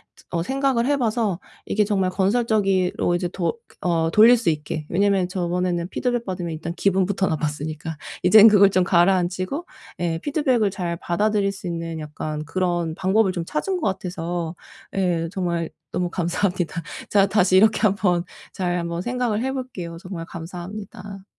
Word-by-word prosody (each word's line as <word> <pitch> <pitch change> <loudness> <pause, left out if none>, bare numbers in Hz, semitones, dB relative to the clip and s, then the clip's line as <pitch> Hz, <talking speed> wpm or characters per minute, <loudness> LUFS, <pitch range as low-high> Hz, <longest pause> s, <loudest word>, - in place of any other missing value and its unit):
드 - - -20
어 170 -1 -1
생각을 265 +1 +1
해 285 +2 +2
봐서 220 -6 0 0.3
이게 210 - +1
정말 195 -3 +1
건설적이로 195 -3 +1
이제 175 0 -1
도 175 +3 -2 0.2
어 165 -2 +1
돌릴 230 +5 +7
수 225 -6 0
있게. 150 0 -3
왜냐하면 195 0 +2
저번에는 180 -1 -1
피드백 240 +2 -1
받으면 180 -3 -4
일단 165 +2 -5
기분부터 190 0 +1
나빴으니까 155 0 -3 0.3
이젠 215 +4 +9
그걸 200 -2 +7
좀 185 -1 +3
가라앉히고 185 - +1 0.3
예 170 -2 -1
피드백을 260 - +1
잘 175 -3 -3
받아들일 200 +3 +1
수 190 -2 -8
있는 165 -1 -4
약간 150 0 -5
그런 175 -1 -1
방법을 190 +2 +2
좀 175 - -3
찾은 365 - -2
것 310 - 0
같아서 175 -3 -3 0.4
예 175 -4 +1
정말 170 -4 -2 0.2
너무 180 -1 -1
감사합니다. 175 -1 -1 0.3
제가 200 -1 +5
다시 190 -2 +3
이렇게 215 +3 +4
한번 195 -4 +2 0.3
잘 180 -2 -1
한번 170 0 -3
생각을 240 -1 -1
해볼게요. 255 -11 -4
정말 180 -2 -7
감사합니다. 190 +3 -8
185 Hz, 350 characters per minute, -23 LUFS, 170-210 Hz, 0.4 s, 이젠